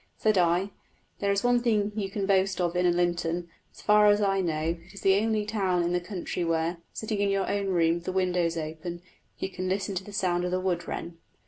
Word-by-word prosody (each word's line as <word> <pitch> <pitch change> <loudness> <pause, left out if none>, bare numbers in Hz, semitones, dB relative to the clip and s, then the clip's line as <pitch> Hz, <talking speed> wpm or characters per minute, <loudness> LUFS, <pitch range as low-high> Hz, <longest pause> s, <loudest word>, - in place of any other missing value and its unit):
Said 215 -1 +2
I, 180 +2 +2 0.5
"There 200 0 +1
is 200 0 +1
one 245 0 +3
thing 215 -4 +1
you 205 -2 -3
can 200 0 -2
boast 195 -1 +2
of 175 -1 0
in 180 0 +3
Lynton. 175 -1 0 0.2
So - - -15
far 210 0 +6
as 205 0 +5
I 195 -2 +2
know, 165 -1 -1
it 185 +3 -17
is - - -9
the 195 0 +4
only 215 -1 0
town 190 -5 0
in 175 +1 0
the 180 - +1
country 180 -1 -4
where, 165 +1 0
sitting 215 -2 -3
in 200 0 +2
your 195 -1 0
own 200 -1 -1
room 170 -3 +3
with 170 - -10
the - - -1
windows 180 -3 +1
open, 165 +2 -5 0.3
you - - -3
can 185 0 -3
listen 195 +1 -1
to 185 0 -3
the 205 - -10
song 180 -3 0
of 180 - -1
the 185 +1 0
wood 180 -2 -1
wren." 170 -1 -5
185 Hz, 235 wpm, -27 LUFS, 175-200 Hz, 0.5 s, far